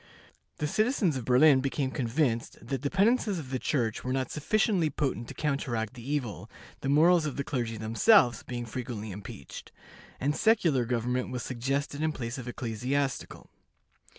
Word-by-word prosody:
The 150 - -2
citizens 215 - +1
of 130 -3 -4
Berlin 130 +2 +6
became 135 0 -1
convinced 120 -2 -1
that 125 +2 -4
the 140 - -1
penances 205 - +2
of 140 -5 -7
the 130 - -1
Church 120 -7 -1
were 125 - -2
not 130 0 -1
sufficiently 180 +1 +1
potent 135 -6 -2
to - - -9
counteract 130 -7 -2
the 125 - -10
evil, 130 -8 -3 0.3
the 135 - -3
morals 160 +3 +5
of 145 - -5
the 140 - -1
clergy 120 -5 -3
themselves 120 - +4
being 120 -1 -5
frequently 115 -2 -5
impeached, 95 -9 -9 0.5
and 145 +3 0
secular 165 - +3
government 125 +1 -1
was 125 -2 -4
suggested 135 +4 -2
in 155 0 +1
place 120 0 -5
of 125 - -8
ecclesiastical. 125 +4 -3
130 Hz, 160 wpm, -29 LUFS, 120-150 Hz, 0.5 s, Berlin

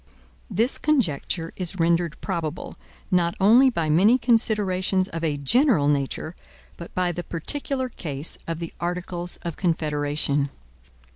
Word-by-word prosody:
This 230 +7 +1
conjecture 175 - 0
is 180 -1 -2
rendered 170 -1 +1
probable, 170 -4 -4 0.4
not 175 0 +2
only 235 +7 +6
by 170 -10 -1
many 190 +11 +5
considerations 205 -6 +2
of 165 0 -5
a 150 -3 0
general 195 - +3
nature, 145 +3 -1 0.4
but 170 - -10
by 180 -1 +1
the 175 +1 -5
particular 260 - -2
case 155 - -5
of 165 -1 -2
the 165 0 -6
Articles 175 0 -4
of 170 -2 -5
Confederation. 145 -4 0
175 Hz, 130 wpm, -24 LUFS, 160-200 Hz, 0.4 s, only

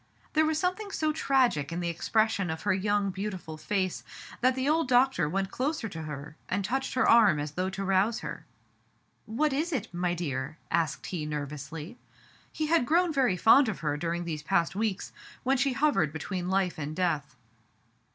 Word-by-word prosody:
There 315 0 +4
was 315 -1 +1
something 370 +5 -1
so 310 -5 0
tragic 255 - +2
in 170 - -3
the 175 - -2
expression 200 +2 +1
of 160 0 -4
her 205 - +2
young, 200 +1 +1
beautiful 185 -4 -5
face 185 +3 -2 0.4
that 255 +1 +3
the 260 +1 -1
old 315 0 +2
doctor 245 - +3
went 195 +3 -1
closer 270 -2 -2
to 165 -3 -7
her 150 -1 -7
and 195 +1 0
touched 265 +6 -2
her 255 - +3
arm 215 -10 +6
as 145 0 -3
though 185 +4 -2
to 195 +1 -4
rouse 195 +4 +2
her. - - -6 0.8
*'What 270 +7 +1
is 315 +6 -1
it, 230 - -3
my 175 0 0
dear?" 145 -3 -3
asked 165 -4 0
he 160 -5 -4
nervously. 150 - -6 0.5
He 310 - -2
had 310 -5 +2
grown 340 +1 +3
very 255 -10 +2
fond 240 +6 +6
of 195 - -5
her 150 -2 0
during 170 +3 -2
these 155 -3 -4
past 170 +2 +1
weeks, 210 -2 -2 0.3
when 270 +2 +2
she 270 +1 +1
hovered 270 - +2
between 180 +3 -4
life 190 -3 0
and 150 +1 -4
death. 155 -7 -1
195 Hz, 185 wpm, -29 LUFS, 160-260 Hz, 0.8 s, arm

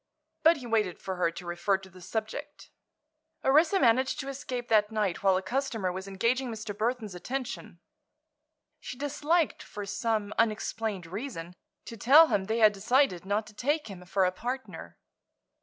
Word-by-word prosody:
But 325 +1 +6
he 255 - -9
waited 215 -6 0
for 190 -1 -5
her 175 -2 +2
to 170 +2 -9
refer 175 +3 0
to 190 0 -14
the 185 0 -15
subject. 225 +10 -5 0.7
Orissa 315 +8 +4
managed 255 0 +3
to 275 - -6
escape 255 -3 -5
that 215 -1 +3
night 210 -5 -1
while 190 -1 +4
a 190 - -3
customer 225 -4 -1
was 190 +2 -6
engaging 235 +7 0
Mr. 215 -2 -5
Burthon's 220 -1 -2
attention. 250 +8 -5 1.0
She 245 - -8
disliked, 295 +3 0
for 205 -1 -7
some 215 0 -1
unexplained 215 -3 -1
reason, 180 -2 -6 0.3
to 230 - -8
tell 295 +9 +7
him 190 -2 +1
they 220 +3 -1
had 215 -2 +6
decided 200 - +1
not 210 +2 0
to 210 - -14
take 290 +5 -1
him 185 -2 -9
for 190 +1 +2
a 180 - +2
partner. 250 +7 -6
220 Hz, 165 wpm, -29 LUFS, 195-260 Hz, 1.0 s, tell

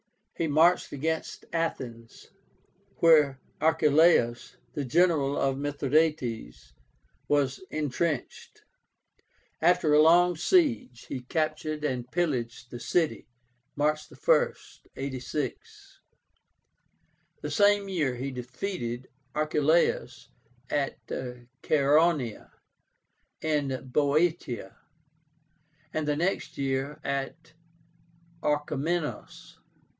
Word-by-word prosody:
He 165 - -1
marched 160 +4 +3
against 160 +3 -3
Athens, 120 -8 -4 0.6
where 150 -5 +5 0.2
Archeláus, 155 -5 +3 0.2
the 145 - -2
general 145 0 +2
of 135 -1 +1
Mithradátes, 140 - -1 0.6
was 140 +1 +1
intrenched. 150 -1 -3 1.0
After 175 -4 +3
a 150 - +7
long 175 +3 +5
siege, 240 - +1
he 130 - -5
captured 155 +3 -2
and 125 -4 -2
pillaged 120 -8 -2
the 120 - -7
city, 160 +6 0 0.5
March 150 +1 0
1, - - +2 0.4
86. 150 - -5 1.4
The - - -3
same 205 -1 +3
year 155 -10 -1
he 135 +3 -4
defeated 125 0 -5 0.3
Archeláus 155 +2 +1 0.4
at 145 -2 -2
CHAERONÉA 135 +2 0 0.9
in 140 -5 -1
Boeotia, 150 - 0 1.2
and 155 -1 -2
the 150 - +1
next 175 +6 -2
year 135 +1 -2
at 140 +4 -4 0.9
ORCHOMENOS. 150 +2 -2
150 Hz, 80 wpm, -28 LUFS, 130-165 Hz, 1.4 s, a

